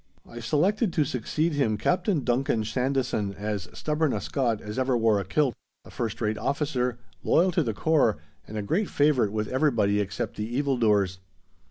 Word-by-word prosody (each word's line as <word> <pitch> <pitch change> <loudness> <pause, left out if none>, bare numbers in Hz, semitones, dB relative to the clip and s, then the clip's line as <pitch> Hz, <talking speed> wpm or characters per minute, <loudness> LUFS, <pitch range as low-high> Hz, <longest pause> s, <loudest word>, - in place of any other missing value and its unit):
I 120 - -9
selected 180 - +1
to 150 - +2
succeed 150 +6 -1
him 115 -7 +1
Captain 175 - +1
Duncan 120 -2 +1
Sandison 125 -3 -1
as 100 -3 -4
stubborn 150 -1 0
a - - -1
Scot 120 -6 -1
as 105 +4 -5
ever 130 -1 +2
wore 110 -3 +3
a - - -2
kilt, 130 +7 +1 0.3
a - - -13
first 115 -1 -3
rate 105 -1 0
officer, 135 -4 -1 0.3
loyal 180 +3 +3
to 170 - +2
the 115 -8 -2
core, 150 -8 +2 0.3
and 110 - -6
a 105 - -2
great 185 - 0
favourite 145 -8 +2
with 105 0 -2
everybody 115 -7 +2
except 100 -2 -3
the 110 +4 -3
evil 140 -1 +1
doers. 100 -5 +2
125 Hz, 180 wpm, -26 LUFS, 105-145 Hz, 0.3 s, wore